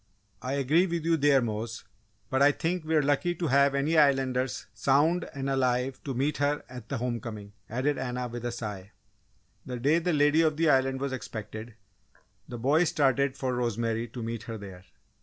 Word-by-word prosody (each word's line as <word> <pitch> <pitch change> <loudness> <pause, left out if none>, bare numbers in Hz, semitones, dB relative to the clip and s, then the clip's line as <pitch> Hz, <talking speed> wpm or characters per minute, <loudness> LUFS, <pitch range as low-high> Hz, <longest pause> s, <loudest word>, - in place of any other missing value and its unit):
"I 130 +1 -3
agree 145 +7 +3
with 170 -2 -3
you 165 0 +3
there, 140 -3 +4
Mose, 115 0 -4 0.5
but 130 +1 +1
I 145 +1 +7
think 170 +3 -2
we're 155 -1 +2
lucky 145 +5 +1
to 170 - -3
have 140 +1 +4
any 155 +4 +2
Islanders 130 -3 +2
sound 155 +6 +2
and 135 -1 -3
alive 130 -1 0
to 135 -3 -3
meet 140 +4 0
her 145 +1 0
at 125 -3 -10
the 140 - -2
homecoming," 115 -4 -5 0.2
added 130 +5 0
Anna, 125 -1 -3
with 120 0 -7
a 120 - -2
sigh. 105 -4 -6 0.7
The 125 -1 -5
day 145 +7 +3
the 175 +1 0
Lady 145 +2 +4
of 155 -2 +2
the 160 -2 +4
Island 130 0 +2
was 140 -1 -2
expected, 110 -2 -7 0.7
the 120 - -6
boys 150 +8 +3
started 140 -1 +1
for 130 -2 -1
Rosemary 115 -1 -1
to 120 +1 -7
meet 115 -1 -4
her 115 - -4
there. 95 -3 -10
130 Hz, 185 wpm, -28 LUFS, 120-145 Hz, 0.7 s, I